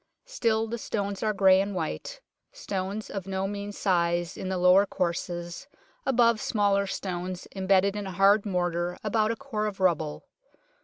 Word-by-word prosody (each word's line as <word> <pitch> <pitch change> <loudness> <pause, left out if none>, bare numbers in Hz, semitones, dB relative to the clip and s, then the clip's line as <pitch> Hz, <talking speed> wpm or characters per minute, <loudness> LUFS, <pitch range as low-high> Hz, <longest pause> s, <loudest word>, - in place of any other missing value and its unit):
Still 225 - 0
the 235 +1 -4
stones 200 -2 -3
are 215 - +1
grey 190 -2 +5
and 200 0 -3
white, 185 - -4 0.3
stones 200 - -4
of 195 -1 -5
no 190 0 -1
mean 205 0 -5
size 175 -3 0
in 185 - -5
the 190 - -1
lower 180 +3 +5
courses, 175 +4 -3 0.4
above 235 -4 +3
smaller 200 -2 +1
stones, 185 -1 -4
embedded 195 +1 +2
in 205 -1 -4
a - - -5
hard 195 +3 +4
mortar 175 -2 -1
about 215 0 +1
a 230 - 0
core 225 -5 -3
of 200 -2 -6
rubble. 165 -5 0
195 Hz, 160 wpm, -27 LUFS, 180-215 Hz, 0.4 s, grey